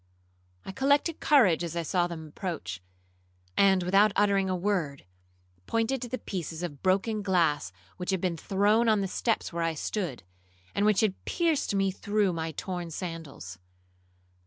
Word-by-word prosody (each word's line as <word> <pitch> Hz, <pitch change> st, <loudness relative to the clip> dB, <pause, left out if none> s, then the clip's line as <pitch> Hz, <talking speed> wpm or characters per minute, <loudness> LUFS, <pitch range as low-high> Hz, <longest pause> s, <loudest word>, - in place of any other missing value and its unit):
I -, -, -5 dB
collected 285 Hz, -, +2 dB
courage 210 Hz, -, +4 dB
as 170 Hz, -1 st, -4 dB
I 170 Hz, -, -1 dB
saw 175 Hz, +2 st, +1 dB
them 165 Hz, -2 st, -7 dB
approach; 145 Hz, -, -5 dB, 0.7 s
and, 190 Hz, -2 st, +4 dB
without 195 Hz, +4 st, +4 dB
uttering 200 Hz, -2 st, +3 dB
a 185 Hz, -, +1 dB
word, 175 Hz, -7 st, -1 dB, 0.6 s
pointed 230 Hz, +3 st, 0 dB
to 245 Hz, -, -5 dB
the 255 Hz, -, -2 dB
pieces 175 Hz, -, -5 dB
of 145 Hz, -6 st, -5 dB
broken 200 Hz, +3 st, +1 dB
glass 170 Hz, -, +1 dB, 0.3 s
which 180 Hz, -, -5 dB
had 190 Hz, -1 st, +1 dB
been 180 Hz, -1 st, -1 dB
thrown 205 Hz, +6 st, +2 dB
on 215 Hz, -2 st, +3 dB
the 195 Hz, -, -1 dB
steps 220 Hz, 0 st, -1 dB
where 170 Hz, -, -2 dB
I 165 Hz, -1 st, 0 dB
stood, 160 Hz, -, -3 dB, 0.5 s
and 205 Hz, +1 st, +2 dB
which 210 Hz, -3 st, +4 dB
had 210 Hz, -4 st, 0 dB
pierced 320 Hz, -, 0 dB
me 195 Hz, -1 st, +2 dB
through 205 Hz, 0 st, 0 dB
my 160 Hz, -1 st, -3 dB
torn 175 Hz, +2 st, -5 dB
sandals. 160 Hz, -, -7 dB
190 Hz, 160 wpm, -28 LUFS, 165-210 Hz, 0.7 s, courage